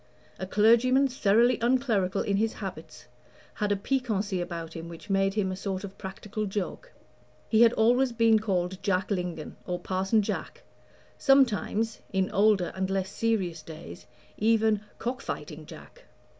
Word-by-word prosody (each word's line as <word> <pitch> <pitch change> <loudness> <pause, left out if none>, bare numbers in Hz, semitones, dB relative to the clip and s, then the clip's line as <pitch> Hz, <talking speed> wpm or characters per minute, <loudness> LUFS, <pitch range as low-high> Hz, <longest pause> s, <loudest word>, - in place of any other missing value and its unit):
A 185 - -4
clergyman 235 +7 +4
thoroughly 240 -1 +3
unclerical 230 -6 +1
in 200 -1 0
his 220 +2 +1
habits 185 -6 -8 0.5
had 210 -1 -1
a - - +3
piquancy 205 -4 -1
about 165 -2 -5
him 165 0 -7
which 170 +4 -9
made 195 0 +2
him 195 -3 0
a - - -3
sort 190 0 -4
of 200 -1 -8
practical 205 +2 -5
joke. 205 - -4 0.6
He 220 0 +3
had 235 -1 +7
always 245 +3 +3
been 230 -1 +4
called 190 -3 -2
Jack 190 0 0
Lingon, 180 -5 -3
or 180 -1 -1
Parson 190 +4 0
Jack - - -5 0.6
sometimes, 230 -4 +2
in 190 -1 0
older 200 -3 +3
and 190 0 -2
less 195 0 -1
serious 195 -9 -1
days, 155 - -11 0.3
even 220 -1 +3 0.2
"Cock 250 +3 -3
fighting - - -6
Jack." - - -13
200 Hz, 150 wpm, -28 LUFS, 185-225 Hz, 0.6 s, had